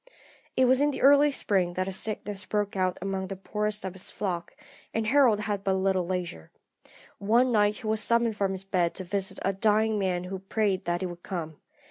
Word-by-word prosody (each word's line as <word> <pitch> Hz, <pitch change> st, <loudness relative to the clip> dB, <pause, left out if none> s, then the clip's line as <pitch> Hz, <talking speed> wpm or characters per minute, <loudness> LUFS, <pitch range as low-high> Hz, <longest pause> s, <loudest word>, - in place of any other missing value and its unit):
"It 260 Hz, -, +5 dB
was 260 Hz, +2 st, +4 dB
in 295 Hz, -, +4 dB
the 285 Hz, -, -4 dB
early 285 Hz, +2 st, +6 dB
spring 185 Hz, -9 st, 0 dB
that 185 Hz, 0 st, -1 dB
a 195 Hz, -, -4 dB
sickness 205 Hz, -1 st, -4 dB
broke 205 Hz, -1 st, -1 dB
out 185 Hz, -1 st, 0 dB
among 190 Hz, -1 st, -2 dB
the 195 Hz, -, -5 dB
poorest 210 Hz, +1 st, -3 dB
of 190 Hz, -, -4 dB
his 190 Hz, 0 st, -5 dB
flock, 175 Hz, -4 st, -4 dB, 0.4 s
and 225 Hz, 0 st, 0 dB
Harold 240 Hz, -3 st, +4 dB
had 205 Hz, -2 st, -3 dB
but 195 Hz, -1 st, +1 dB
little 190 Hz, -2 st, +1 dB
leisure. 175 Hz, -, -4 dB, 0.7 s
One 235 Hz, +5 st, +3 dB
night 210 Hz, -2 st, +3 dB
he 245 Hz, -, -11 dB
was 215 Hz, 0 st, 0 dB
summoned 235 Hz, -1 st, +2 dB
from 195 Hz, -2 st, 0 dB
his 190 Hz, 0 st, -6 dB
bed 180 Hz, -3 st, 0 dB
to 190 Hz, -, -3 dB
visit 195 Hz, +1 st, -2 dB
a 195 Hz, -, +1 dB
dying 215 Hz, +2 st, +2 dB
man 180 Hz, -2 st, -1 dB
who 185 Hz, +1 st, -5 dB
prayed 195 Hz, 0 st, -1 dB
that 175 Hz, +1 st, -1 dB
he -, -, -1 dB
would 175 Hz, -1 st, -7 dB
come. 160 Hz, -6 st, -5 dB
195 Hz, 210 wpm, -27 LUFS, 185-215 Hz, 0.7 s, early